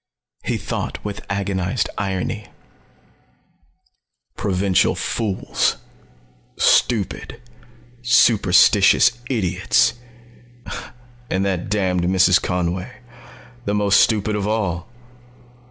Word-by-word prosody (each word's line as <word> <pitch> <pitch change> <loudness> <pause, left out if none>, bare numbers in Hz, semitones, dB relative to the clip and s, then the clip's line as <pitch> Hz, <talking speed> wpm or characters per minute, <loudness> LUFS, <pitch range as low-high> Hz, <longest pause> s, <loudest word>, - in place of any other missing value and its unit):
He - - -1
thought - - -4
with 105 -1 -5
agonized 100 +2 -1
irony: 100 +2 -3 1.9
"Provincial 95 -1 +1
fools. 105 -5 -1 0.8
Stupid, 110 -6 +1 0.6
superstitious 110 -2 +5 0.2
idiots... 110 +1 +1 1.4
and 95 +1 0
that 90 -2 -2
damned 95 -4 0
Mrs. 95 +1 +4
Conway 90 +4 -2 0.7
the 100 - -1
most 100 -1 +3
stupid 105 -1 +2
of 105 -1 -2
all. 100 -4 -2
100 Hz, 75 wpm, -20 LUFS, 95-105 Hz, 1.9 s, superstitious